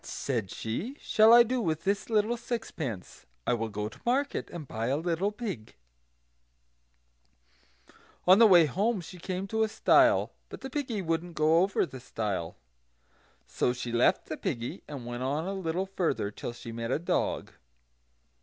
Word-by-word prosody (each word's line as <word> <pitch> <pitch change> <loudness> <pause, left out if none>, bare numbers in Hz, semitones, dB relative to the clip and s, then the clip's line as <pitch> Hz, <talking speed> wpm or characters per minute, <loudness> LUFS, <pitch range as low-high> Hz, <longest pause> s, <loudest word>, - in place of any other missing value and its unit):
"What," - - -14
said 115 -8 -2
she, 180 - -4
"shall 220 +1 +5
I 240 0 +9
do 250 +1 -1
with 160 -4 -1
this 200 +4 -1
little 220 +1 +2
sixpence? 160 - -5 0.2
I - - +2
will 115 -1 -2
go 105 0 -3
to - - -13
market, 270 +4 0
and 160 -5 -8
buy 110 0 -3
a 135 +3 +1
little 175 +5 0
pig." 205 - -6 2.5
On 185 +3 +7
the 230 - +9
way 175 -5 +7
home 200 - 0
she 180 +2 -11
came 185 +2 -3
to 220 +1 0
a 220 - +3
stile; - - +4 0.2
but - - -9
the 265 - -7
piggy 250 -8 -2
wouldn't 165 +1 -2
go 155 +2 +4
over 190 0 +2
the 130 -6 -10
stile. 100 -8 -3 0.9
So 125 - 0
she 125 -1 -5
left 120 +1 +3
the - - -5
piggy 120 +1 -4
and 140 -5 -7
went 120 +1 -5
on 145 +5 -1
a 195 - -3
little 185 -1 -2
further, 180 - -1
till 120 - -6
she 120 -1 -9
met 115 0 -4
a - - +1
dog. 170 - -1
165 Hz, 175 wpm, -29 LUFS, -, 2.5 s, I